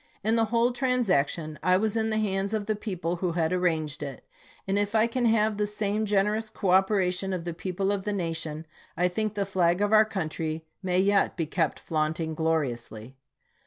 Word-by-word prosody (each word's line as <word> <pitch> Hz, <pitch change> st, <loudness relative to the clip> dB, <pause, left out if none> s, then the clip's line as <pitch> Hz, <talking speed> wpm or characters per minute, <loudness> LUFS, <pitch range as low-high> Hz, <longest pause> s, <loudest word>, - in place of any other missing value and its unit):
In 220 Hz, +2 st, +2 dB
the 225 Hz, -1 st, +3 dB
whole 230 Hz, +2 st, +2 dB
transaction 185 Hz, -, 0 dB
I 185 Hz, +2 st, +4 dB
was 215 Hz, +2 st, 0 dB
in 220 Hz, -1 st, +1 dB
the 215 Hz, -, 0 dB
hands 200 Hz, 0 st, 0 dB
of 210 Hz, -1 st, -2 dB
the 215 Hz, 0 st, 0 dB
people 180 Hz, -5 st, -3 dB
who 175 Hz, -1 st, -1 dB
had 165 Hz, 0 st, 0 dB
arranged 160 Hz, -5 st, 0 dB
it, 140 Hz, -3 st, -6 dB, 0.4 s
and 195 Hz, +1 st, +1 dB
if 205 Hz, +1 st, -1 dB
I 220 Hz, 0 st, +5 dB
can 240 Hz, +1 st, -1 dB
have 220 Hz, -2 st, +2 dB
the 210 Hz, 0 st, 0 dB
same 210 Hz, +1 st, -1 dB
generous 210 Hz, +2 st, +1 dB
cooperation 190 Hz, -1 st, +2 dB
of 180 Hz, -2 st, -3 dB
the 170 Hz, -, -3 dB
people 190 Hz, +3 st, -2 dB
of 200 Hz, -1 st, -1 dB
the 210 Hz, +2 st, -3 dB
nation, 165 Hz, -4 st, -3 dB, 0.3 s
I 180 Hz, -, +3 dB
think 215 Hz, +4 st, -2 dB
the 200 Hz, -1 st, 0 dB
flag 180 Hz, -2 st, +2 dB
of 205 Hz, +1 st, +1 dB
our 215 Hz, 0 st, +7 dB
country 160 Hz, -5 st, -3 dB, 0.2 s
may 180 Hz, -2 st, 0 dB
yet 200 Hz, +1 st, +2 dB
be 165 Hz, -, 0 dB
kept 160 Hz, -1 st, -1 dB
flaunting 160 Hz, +1 st, -1 dB
gloriously. 130 Hz, -7 st, -2 dB
190 Hz, 195 wpm, -27 LUFS, 165-210 Hz, 0.4 s, our